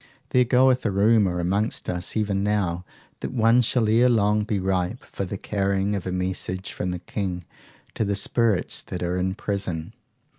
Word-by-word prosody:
There 125 -1 +4
goeth 130 +1 +4
a 110 - +1
rumour 100 -2 +3
amongst 100 +5 -1
us 90 +3 -3
even 100 -2 0
now 100 -4 0 0.4
that - - -4
one 115 0 +4
shall 120 -1 +2
ere 115 +4 +4
long 105 -2 +2
be 105 -2 -1
ripe 95 +4 -1
for 100 - -5
the 95 +2 -5
carrying 100 0 0
of 95 -2 -4
a - - -2
message 90 +1 -3
from 90 - -3
the 90 - -2
King 90 -1 -4 0.5
to - - -1
the 100 -1 0
spirits 110 -1 0
that 90 -1 -6
are 90 +1 -1
in 95 +1 -1
prison. 95 -7 -3
100 Hz, 180 wpm, -24 LUFS, 90-110 Hz, 0.5 s, There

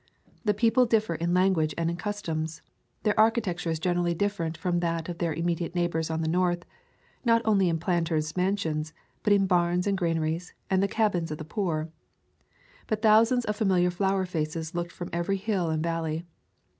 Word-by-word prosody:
The 210 -3 +2
people 235 +4 +3
differ 220 -5 +2
in 170 +2 0
language 180 -5 +2
and 165 -1 0
in 170 - -1
customs. 165 -6 -4 0.4
Their 210 -1 +3
architecture 215 -6 +2
is 160 - 0
generically 175 +1 0
different 170 -4 -1
from 175 -2 0
that 165 -1 -1
of 175 -1 -5
their 170 -2 0
im 165 +2 -3
mediate 170 0 -1
neighbors 170 -2 0
on 160 0 -1
the - - -1
north, 175 +1 +1 0.6
not 230 -1 +3
only 195 -4 +3
in 165 - +1
planters' 165 -2 -1
mansions, 165 -5 -1 0.3
but 210 - +1
in 200 -1 +5
barns 175 -1 +2
and 200 -1 +1
granaries 165 -1 -1 0.2
and 190 0 +3
the 200 - +2
cabins 200 -6 0
of 150 - -4
the 155 - -7
poor. 165 -4 -2 1.0
But 215 0 -2
thousands 225 +3 +5
of 210 - -1
familiar 185 -4 +2
flower 190 +1 0
faces 160 -2 -3
looked 175 0 -3
from 175 - -7
every 170 +3 0
hill 190 -4 -1
and 160 0 -1
valley. 165 0 -2
175 Hz, 180 wpm, -27 LUFS, 165-200 Hz, 1.0 s, in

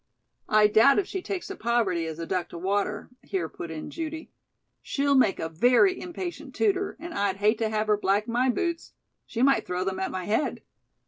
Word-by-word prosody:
"I 215 0 +5
doubt 220 +6 +5
if 400 - +2
she 380 0 -4
takes 370 -1 -4
to 390 - -5
poverty 215 - 0
as 160 -1 -6
a 165 - -4
duck 180 -1 -2
to - - -8
water," 205 +5 -2
here 185 -5 -3
put 170 - -8
in 160 -1 -6
Judy. 320 -1 -6 0.5
"She'll 280 0 0
make 255 -8 +3
a 160 - -2
very 250 - +3
impatient 350 0 -6
tutor, 390 -2 0
and 335 0 -7
I'd 200 -2 0
hate 210 +2 +2
to 220 -1 0
have 215 0 0
her 210 -1 +2
black 205 +1 +1
my 245 +3 +1
boots. 340 +5 -2 0.3
She 235 - -1
might 275 0 +3
throw 180 0 -1
them 190 0 -2
at 190 - -1
my 185 -1 -4
head." 220 +9 -1
220 Hz, 205 wpm, -26 LUFS, 190-305 Hz, 0.5 s, I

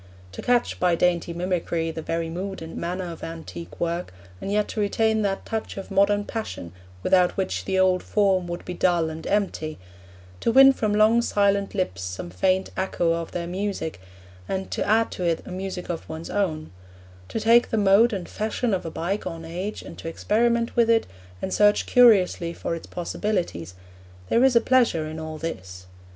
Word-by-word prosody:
To 95 - -7
catch, 245 -1 +1
by 180 -1 +3
dainty 175 0 +1
mimicry, 170 -2 -1
the 160 - -6
very 165 +1 -2
mood 185 +2 -5
and 160 0 -8
manner 180 +1 -3
of 165 - -10
antique 90 - -8
work, 170 +1 -2 0.3
and 195 - -4
yet 210 0 +1
to - - -4
retain 220 +1 +1
that 195 -2 -1
touch 220 -2 -4
of 195 - -7
modern 200 +1 +3
passion 215 - -5 0.3
without 180 -1 +3
which 190 - -2
the 190 - 0
old 185 -1 +3
form 190 -4 +1
would 175 0 -6
be 180 - -4
dull 170 -2 +1
and 160 +1 -7
empty; 185 -6 -1 0.6
to - - +1
win 270 +2 +8
from 215 -5 -1
long 220 +2 +5
silent 200 -2 +1
lips 140 - -2
some 90 -1 -5
faint 185 - +1
echo 175 -3 0
of 165 0 -4
their 170 -1 -3
music, 180 - -3 0.5
and 190 0 -3
to - - -1
add 225 +2 +3
to 180 - -5
it 170 -2 0
a - - -9
music 185 -1 -5
of 170 -2 -5
one's 160 +1 -6
own; 160 -6 -1 0.6
to - - -3
take 230 +2 +4
the 225 - 0
mode 205 +4 +5
and 190 -5 -4
fashion 220 +1 -2
of 180 -3 -2
a - - -3
bygone 165 -1 -4
age, 180 +6 -5
and - - -10
to - - -7
experiment 230 +7 +1
with 235 -1 +3
it, 225 -1 +4 0.4
and 190 - -2
search 205 0 +4
curiously 190 -8 +4
for - - -4
its 165 - -6
possibilities; 175 - -3 0.5
there 235 - +4
is 265 -2 +4
a 235 - +6
pleasure 235 -11 +3
in 155 +1 -6
all 160 0 -6
this. 95 - -6
185 Hz, 190 wpm, -24 LUFS, 165-210 Hz, 0.6 s, win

